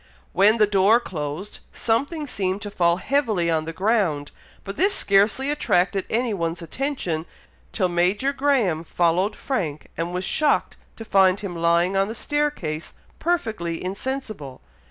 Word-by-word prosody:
When 205 +5 +5
the 215 - +5
door 205 +3 +4
closed, 160 -1 -5
something 285 +7 -1
seemed 195 -5 -2
to 205 - -6
fall 170 -3 +2
heavily 215 -7 +1
on 160 -1 0
the 165 - -4
ground, 185 -6 0 0.3
but 195 - -6
this 395 +5 +3
scarcely 210 +8 +3
attracted 190 -9 +1
any 235 0 0
one's 170 -2 -3
attention, 175 - -3 0.4
till 190 -5 +1
Major 185 +10 +1
Graham 255 - +1
followed 175 +5 +1
Frank, 160 - -3
and 165 +2 -3
was 180 +1 -3
shocked 305 +7 +1 0.2
to 225 - -9
find 195 -1 +4
him 190 -4 -5
lying 170 +2 +2
on 195 0 +2
the 220 - -5
staircase 285 - -2 0.2
perfectly 220 - -1
insensible. 200 - -5
195 Hz, 145 wpm, -23 LUFS, 170-235 Hz, 0.4 s, When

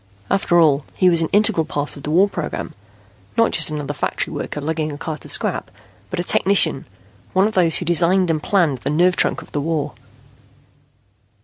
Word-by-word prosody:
After 185 -3 +2
all, 150 -3 +3
he 185 -1 +3
was 170 -1 +2
an 165 - 0
integral 205 -5 +3
part 145 -1 -4
of 140 - -11
the 145 - -6
war 180 +6 +4
program, - - -5 0.6
not 230 0 +3
just 155 -2 +5
another 145 -2 -4
factory - - -3
worker - - -5
lugging 155 +1 -3
a 145 - -7
cart 155 0 -6
of - - -11
scrap, - - +1 0.4
but 185 - -4
a - - -1
technician, 195 +2 +2 0.5
one 190 +1 +3
of 215 - -1
those 175 -4 +3
who 180 - -2
designed 175 +2 +3
and 155 -1 -2
planned 165 -10 +1
the - - -4
nerve 175 +4 +2
trunk - - 0
of - - -19
the 145 - -2
war. 150 -2 -2
165 Hz, 195 wpm, -19 LUFS, 150-185 Hz, 0.6 s, just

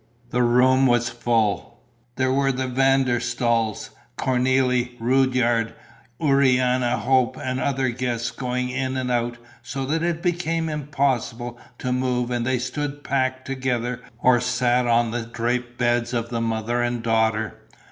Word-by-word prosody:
The 125 - +1
room 130 +2 +4
was 120 -1 +2
full: 115 -4 -1 0.4
there 130 0 +1
were 135 0 +2
the 130 0 -2
Van 135 +1 +3
der 120 -2 0
Staals, 115 -3 -1 0.3
Cornélie, 125 -1 +1
Rudyard, 120 -2 +2 0.4
Urania 130 -4 +3
Hope 130 -3 +2
and 130 0 -3
other 135 -1 0
guests 120 -1 -2
going 125 -1 -2
in 130 0 -2
and 125 -1 -2
out, 120 0 0 0.2
so 135 -1 -4
that 160 +4 -1
it 170 -1 -1
became 165 -2 0
impossible 135 -5 -2 0.2
to 125 - -3
move 125 -1 0
and 120 -1 -1
they 130 -1 +2
stood 145 +3 -4
packed 130 -1 -1
together 125 -2 -2 0.2
or 120 0 +4
sat 125 0 +1
on 120 -1 +3
the 120 +1 -2
draped 120 +1 -3
beds 120 0 +1
of 115 0 -2
the 115 -1 -2
mother 115 +1 -1
and 120 -1 -1
daughter. 110 -2 0
125 Hz, 145 wpm, -23 LUFS, 120-130 Hz, 0.4 s, room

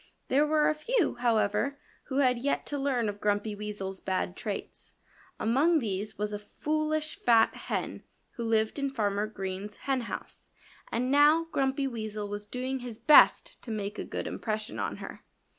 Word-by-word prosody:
There 290 +3 +4
were 305 0 +3
a - - +3
few, 385 +6 +1
however, 235 +3 +1 0.3
who 265 - -3
had 255 -3 +3
yet 280 +3 -1
to 290 - -3
learn 260 -5 +1
of 205 0 -5
Grumpy 205 +1 0
Weasel's 205 -2 -5
bad 185 -1 -2
traits. 205 0 -6 0.4
Among 280 +10 +3
these 210 -5 -3
was 210 0 -2
a 205 - -3
foolish, 310 +7 -2
fat 230 -2 +5
hen - - -4 0.3
who 235 - -6
lived 220 +2 +1
in 275 0 0
Farmer 210 -5 0
Green's 195 0 -5
henhouse. 260 -4 -3 0.4
And 250 +3 0
now 295 +3 +6
Grumpy 270 0 +1
Weasel 215 -4 -4
was 205 0 -6
doing 255 +4 -3
his 245 -3 -7
best 285 +6 +6
to - - -10
make 205 -2 -3
a - - -2
good - - -4
impression 215 -1 -3
on - - -2
her. - - -9
230 Hz, 165 wpm, -29 LUFS, 210-280 Hz, 0.4 s, now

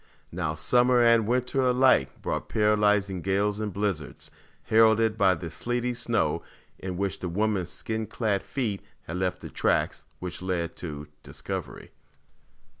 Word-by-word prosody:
Now, 80 -3 -2
summer 125 +8 +3
and 115 -2 +5
winter 125 +2 +1
alike 125 - +3
brought - - -3
paralyzing 105 -3 +2
gales 100 +3 0
and 105 -1 -2
blizzards, 95 -6 -3 0.3
heralded 110 0 +4
by 95 -4 +4
the 85 -1 -7
sleety 120 +7 -2
snow 120 - 0 0.4
in 90 -1 -5
which 100 0 -2
the 90 - -3
woman's 100 -1 0
skin 110 -1 -4
clad 105 -5 0
feet 110 -8 -3 0.2
had 85 - -5
left 90 0 -1
the - - -7
tracks - - 0
which 90 -1 -6
led 90 -2 -2
to 75 -3 -6
discovery. - - -6
105 Hz, 140 wpm, -27 LUFS, 90-115 Hz, 0.4 s, and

